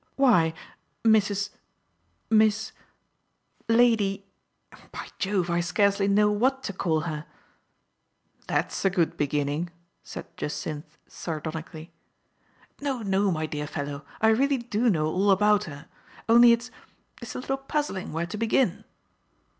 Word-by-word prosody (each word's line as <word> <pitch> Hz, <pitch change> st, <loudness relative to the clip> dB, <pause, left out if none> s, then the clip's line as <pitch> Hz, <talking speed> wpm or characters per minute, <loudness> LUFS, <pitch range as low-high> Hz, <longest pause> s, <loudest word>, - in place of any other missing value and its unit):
Why, 180 Hz, -13 st, +4 dB, 0.5 s
Mrs. 205 Hz, -3 st, +3 dB, 0.4 s
— -, -, -45 dB
Miss 220 Hz, 0 st, +3 dB, 0.5 s
— -, -, -41 dB
Lady 205 Hz, -5 st, +3 dB, 0.4 s
— -, -, -20 dB
by -, -, -7 dB
Jove, 190 Hz, -3 st, 0 dB
I 170 Hz, -, +1 dB
scarcely 200 Hz, +3 st, +2 dB
know 210 Hz, +1 st, +4 dB
what 260 Hz, +6 st, +1 dB
to 200 Hz, -, -4 dB
call 165 Hz, -4 st, 0 dB
her! 155 Hz, -1 st, -5 dB, 1.2 s
"That's -, -, -1 dB
a 195 Hz, -, +4 dB
good 175 Hz, -3 st, 0 dB
beginning, 145 Hz, +3 st, -1 dB, 0.3 s
said -, -, -8 dB
Jacynth 150 Hz, +1 st, -5 dB
sar 160 Hz, -3 st, -5 dB
donically. 160 Hz, +1 st, -7 dB, 0.5 s
" -, -, -33 dB
No, 270 Hz, -5 st, -2 dB
no, 195 Hz, 0 st, +2 dB
my 155 Hz, -3 st, -1 dB
dear 150 Hz, -1 st, -4 dB
fellow, 145 Hz, 0 st, -5 dB, 0.2 s
I 220 Hz, -, +4 dB
really 270 Hz, +5 st, +3 dB
do 235 Hz, -1 st, 0 dB
know 155 Hz, -7 st, +1 dB
all 185 Hz, +6 st, +1 dB
about 210 Hz, +1 st, +4 dB
her; 145 Hz, -4 st, -10 dB, 0.4 s
only 235 Hz, +1 st, +8 dB
it's 235 Hz, +1 st, 0 dB, 0.2 s
— 255 Hz, -, -27 dB
it's 235 Hz, -, -7 dB
a -, -, -3 dB
little 270 Hz, +1 st, -2 dB
puzzling 270 Hz, -8 st, -3 dB
where 165 Hz, +2 st, -2 dB
to 180 Hz, +5 st, -6 dB
begin." 225 Hz, -2 st, +1 dB
200 Hz, 145 wpm, -26 LUFS, 160-225 Hz, 1.2 s, only